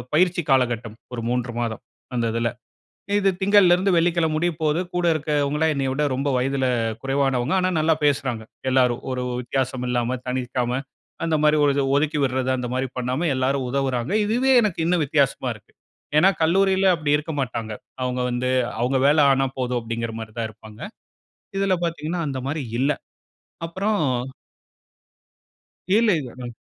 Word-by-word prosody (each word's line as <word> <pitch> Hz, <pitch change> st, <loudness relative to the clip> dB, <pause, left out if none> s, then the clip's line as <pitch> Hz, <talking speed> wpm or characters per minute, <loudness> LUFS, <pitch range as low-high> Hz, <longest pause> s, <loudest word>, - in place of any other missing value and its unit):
பயிற்சி 175 Hz, 0 st, +3 dB
காலகட்டம், 120 Hz, -4 st, +1 dB, 0.2 s
ஒரு 115 Hz, -2 st, -4 dB
3 125 Hz, 0 st, -1 dB
மாதம், 115 Hz, -2 st, -3 dB, 0.3 s
அந்த 120 Hz, -1 st, 0 dB
இதுல. 115 Hz, 0 st, 0 dB, 0.7 s
இது 195 Hz, -1 st, +3 dB
திங்கள்ல 195 Hz, -2 st, +6 dB
இருந்து 190 Hz, +2 st, +1 dB
வெள்ளிக்கிழம 165 Hz, -2 st, +2 dB
முடிய 175 Hz, +2 st, +1 dB
போகுது, 155 Hz, +2 st, +1 dB
கூட 175 Hz, 0 st, 0 dB
இருக்கவங்கல்லாம் 150 Hz, 0 st, 0 dB
என்னைய 135 Hz, -2 st, -1 dB
விட 150 Hz, +3 st, 0 dB
ரொம்ப 140 Hz, +2 st, -1 dB
வயதுல 135 Hz, +1 st, 0 dB, 0.4 s
குறைவானவங்க. 135 Hz, 0 st, 0 dB
ஆனா, 185 Hz, -, +1 dB
நல்லா 160 Hz, +1 st, +3 dB
பேசுறாங்க, 135 Hz, -5 st, 0 dB, 0.3 s
எல்லோரும். 125 Hz, -2 st, +3 dB
ஒரு 125 Hz, -, -2 dB, 0.2 s
வித்தியாசம் 130 Hz, 0 st, -2 dB
இல்லாம, 125 Hz, +1 st, 0 dB
தனிர்க்காம, 125 Hz, 0 st, -1 dB, 0.5 s
அந்த 160 Hz, -, +1 dB
மாரி 150 Hz, 0 st, +4 dB
ஒரு 145 Hz, -, +4 dB
இது, 140 Hz, -, +1 dB
ஒதுக்கி 150 Hz, +1 st, +1 dB
விடுறது 130 Hz, -1 st, 0 dB
அந்த 125 Hz, -, -3 dB
மாரி 130 Hz, +1 st, -1 dB
பண்ணாம, 130 Hz, +7 st, -1 dB
எல்லாரும் 130 Hz, +1 st, 0 dB
உதவுறாங்க. 130 Hz, +1 st, -1 dB
இதுவே 245 Hz, +5 st, +2 dB
எனக்கு 205 Hz, -7 st, -1 dB
இன்னும் 175 Hz, -1 st, +2 dB
வித்தியாசமா 140 Hz, -2 st, +1 dB
இருக்கு. 105 Hz, -, -20 dB, 0.4 s
ஏன்னா 180 Hz, +5 st, +6 dB
கல்லூரியில 190 Hz, +3 st, +3 dB
அப்படி 150 Hz, -3 st, -1 dB
இருக்க 150 Hz, +2 st, -5 dB
மாட்டாங்க. 115 Hz, -4 st, -3 dB, 0.3 s
அவுங்க 125 Hz, 0 st, -1 dB
வந்து, 125 Hz, +1 st, -1 dB, 0.3 s
அவுங்க 125 Hz, +3 st, +1 dB
வேல 150 Hz, +2 st, +4 dB
ஆனா 135 Hz, 0 st, +2 dB
போதும் 125 Hz, -1 st, 0 dB
அப்டிங்குற 115 Hz, 0 st, -4 dB
மாரி 110 Hz, -1 st, -8 dB
தான் 115 Hz, -, -1 dB
இருப்பாங்க. 110 Hz, 0 st, -14 dB, 0.8 s
இதுல 195 Hz, -1 st, +2 dB
பாத்தீங்கன்னா, 170 Hz, +1 st, -2 dB
அந்த 130 Hz, -2 st, -3 dB
மாரி 150 Hz, +1 st, -2 dB, 0.2 s
இல்ல. 140 Hz, +3 st, +2 dB, 0.8 s
அப்புறம் 195 Hz, +3 st, -1 dB, 1.9 s
இல்ல, 225 Hz, +1 st, +4 dB
இல்ல. 130 Hz, -4 st, -7 dB, 0.2 s
ம், 120 Hz, -, -7 dB
135 Hz, 155 wpm, -23 LUFS, 125-160 Hz, 1.9 s, திங்கள்ல